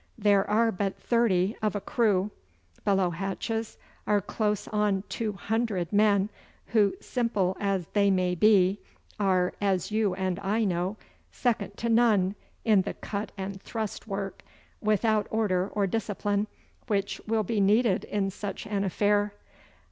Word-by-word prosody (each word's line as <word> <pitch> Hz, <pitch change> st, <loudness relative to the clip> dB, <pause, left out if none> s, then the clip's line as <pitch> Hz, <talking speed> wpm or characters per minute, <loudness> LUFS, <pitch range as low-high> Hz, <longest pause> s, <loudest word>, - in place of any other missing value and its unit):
There 205 Hz, -2 st, +3 dB
are 225 Hz, +2 st, +3 dB
but 195 Hz, 0 st, -2 dB
thirty 215 Hz, -4 st, +2 dB
of 215 Hz, -1 st, 0 dB
a -, -, 0 dB
crew. 205 Hz, -2 st, +1 dB, 0.5 s
Below 195 Hz, -3 st, +2 dB
hatches 200 Hz, +5 st, -3 dB, 0.3 s
are 210 Hz, -1 st, +4 dB
close 210 Hz, +1 st, -1 dB
on 210 Hz, -2 st, +1 dB
two 220 Hz, -2 st, -2 dB
hundred 210 Hz, -3 st, -2 dB
men, 205 Hz, 0 st, +3 dB, 0.4 s
who, 210 Hz, -3 st, +3 dB
simple 210 Hz, -7 st, 0 dB
as 195 Hz, -3 st, 0 dB
they 200 Hz, -1 st, +4 dB
may 185 Hz, -2 st, +2 dB
be, 195 Hz, +1 st, +4 dB, 0.4 s
are, 185 Hz, -3 st, +2 dB
as 195 Hz, -1 st, 0 dB
you 210 Hz, -3 st, +1 dB
and 185 Hz, -1 st, -1 dB
I 205 Hz, +3 st, 0 dB
know, 185 Hz, +1 st, -1 dB, 0.3 s
second 230 Hz, -4 st, -1 dB
to 235 Hz, -, -2 dB
none 220 Hz, -5 st, +4 dB, 0.3 s
in 215 Hz, -4 st, +5 dB
the -, -, -4 dB
cut 205 Hz, 0 st, -5 dB
and 195 Hz, 0 st, -5 dB
thrust 220 Hz, -1 st, -5 dB
work, 195 Hz, -1 st, -4 dB, 0.4 s
without 215 Hz, 0 st, +2 dB
order 195 Hz, -4 st, +1 dB
or 205 Hz, 0 st, 0 dB
discipline, 205 Hz, 0 st, -1 dB, 0.4 s
which 200 Hz, -3 st, -1 dB
will 220 Hz, 0 st, +1 dB
be 215 Hz, +2 st, -1 dB
needed 205 Hz, 0 st, +3 dB
in 195 Hz, -2 st, -1 dB
such 205 Hz, +3 st, -6 dB
an 205 Hz, -2 st, -1 dB
affair. 205 Hz, +1 st, +1 dB
205 Hz, 145 wpm, -28 LUFS, 195-215 Hz, 0.5 s, in